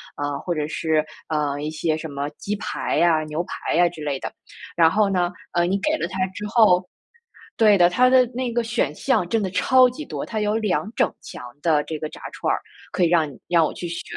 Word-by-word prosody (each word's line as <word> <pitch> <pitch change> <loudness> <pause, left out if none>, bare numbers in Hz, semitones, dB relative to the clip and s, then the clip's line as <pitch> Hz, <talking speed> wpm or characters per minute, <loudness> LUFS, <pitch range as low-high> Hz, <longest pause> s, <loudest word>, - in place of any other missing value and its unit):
啊， 145 0 -3
或 175 - -3
者 150 -2 -2
是， 160 -1 0 0.3
呃， 145 -2 -1
一 150 +1 -3
些 155 0 -1
什 160 0 -6
么 140 0 -4
鸡 205 - -3
排 - - -3
呀、 165 -2 +3
牛 155 +3 -3
排 - - -4
呀 175 +1 +4
之 155 -3 -9
类 140 -2 -2
的。 - - -5 0.4
然 165 -1 +5
后 210 -1 +2
呢， 180 -2 +1 0.2
呃， 175 0 +2
你 195 +3 0
给 305 +7 0
了 - - -2
他 190 0 -2
之 205 +3 -7
后 190 -5 +4 0.7
对 210 -3 +5
的， 175 0 +6
它 250 +8 +3
的 255 -1 +5
那 250 -1 -2
个 240 +1 +1
选 230 - -1
项 175 - +1
真 220 +3 0
的 190 - -1
超 255 +3 +5
级 295 +5 -7
多， - - -5
它 220 - -3
有 210 0 0
2 215 0 -1
整 - - +2
墙 - - -9 0.2
的 155 -3 +3
这 155 -1 -5
个 155 0 -5
炸 - - -12
串 - - -1
儿， - - -1 0.3
可 - - -1
以 170 - +5
让 165 -2 +3
你 135 - -15
让 170 -2 +4
我 - - -1
去 175 - -6
选， 170 - -5
175 Hz, 250 characters per minute, -23 LUFS, 155-210 Hz, 0.7 s, 的